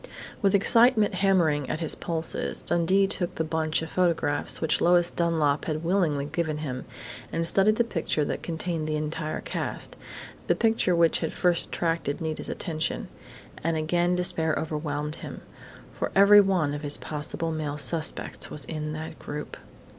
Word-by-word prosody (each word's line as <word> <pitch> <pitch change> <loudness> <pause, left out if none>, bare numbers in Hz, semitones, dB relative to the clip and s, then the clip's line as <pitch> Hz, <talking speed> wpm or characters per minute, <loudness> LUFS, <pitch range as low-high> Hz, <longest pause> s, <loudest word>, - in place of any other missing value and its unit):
With 200 -1 +3
excitement 225 +1 +4
hammering 175 -7 +2
at - - -2
his 160 -2 +3
pulses, 165 -1 -2
Dundee 185 +4 +3
took 185 -2 -1
the 160 - -1
bunch 160 0 0
of 160 - -7
photographs 165 -5 0
which 160 -1 0
Lois 175 0 +4
Dunlap 160 -4 +1
had 155 0 -3
willingly 165 -6 +1
given 155 0 -2
him, 130 -4 -5 0.5
and 165 0 -1
studied 200 +4 +4
the 235 - +2
picture 165 -8 -1
that - - -3
contained 165 -1 -3
the 155 - -1
entire 155 +1 -3
cast - - -4 0.5
the - - +3
picture 225 -6 +2
which 170 -1 +3
had 160 - -2
first 175 -2 +1
attracted 165 -4 -2
Nita's 160 -1 -4
attention. 160 -3 -3 0.5
And 165 0 0
again 175 +3 +1
despair 160 -3 +2
overwhelmed 150 -1 -3
him, - - -8 0.5
for - - -3
every 200 +1 +8
one 180 -7 +1
of 145 - -5
his 145 -1 0
possible 155 +2 -3
male 150 -2 -3
suspects 155 +3 +1
was 145 -3 -5
in 155 -1 -4
that 155 +1 -7
group.... 150 0 -6
160 Hz, 160 wpm, -26 LUFS, 155-175 Hz, 0.5 s, every